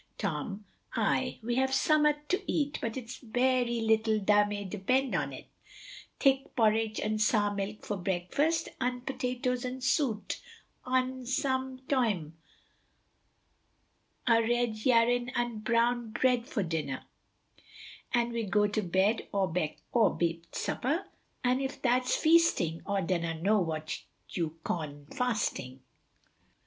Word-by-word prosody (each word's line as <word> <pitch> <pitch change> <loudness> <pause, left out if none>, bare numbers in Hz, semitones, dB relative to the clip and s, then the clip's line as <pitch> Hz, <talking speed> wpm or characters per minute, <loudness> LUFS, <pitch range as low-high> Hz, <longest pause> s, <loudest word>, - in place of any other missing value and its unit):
Tom 195 +3 -3 0.3
Aye, - - +1
we 240 +2 -1
have 265 0 +2
summat 300 +1 +3
to 370 +3 +1
eat, 290 -2 0
but 230 +2 -3
it's 245 -1 -6
very 245 0 +1
lettle 220 -1 +2
tha 205 +1 +4
may 205 -1 -4
depend 235 +7 0
on't, - - -2 0.7
thick 270 -1 +2
porrich 220 -1 +2
un' 215 0 0
sour 210 -1 +3
milk 200 +1 -4
for 205 - -2
brekfast, 195 - 0
un' 250 0 -1
potatos 250 -1 -2
and 255 0 -5
suit, 260 -6 0 0.4
un 255 0 0
sum 260 0 -1
toime 210 - +1 1.9
a 230 -2 +5
red 240 0 +1
yarrin 245 0 +3
un 240 -2 -1
brown 235 +1 +1
bread 245 +1 +1
for 240 -9 -1
dinner, 155 -6 -3 1.1
an 240 -1 +1
we 235 -1 -2
go 210 0 +2
to 210 +1 0
bed 190 +4 +1
awebewt 170 -1 0
supper, 305 +9 -1 0.4
un 250 +1 +2
if 270 0 -3
that's 250 0 +2
feasting 315 - +3
aw 200 -1 +1
dunna 170 -2 -1
know 205 +5 +3
what 155 -3 -3 0.3
you 165 -2 -3
cawn 145 -4 -4
fasting. 210 - -1
230 Hz, 125 wpm, -30 LUFS, 200-255 Hz, 1.9 s, a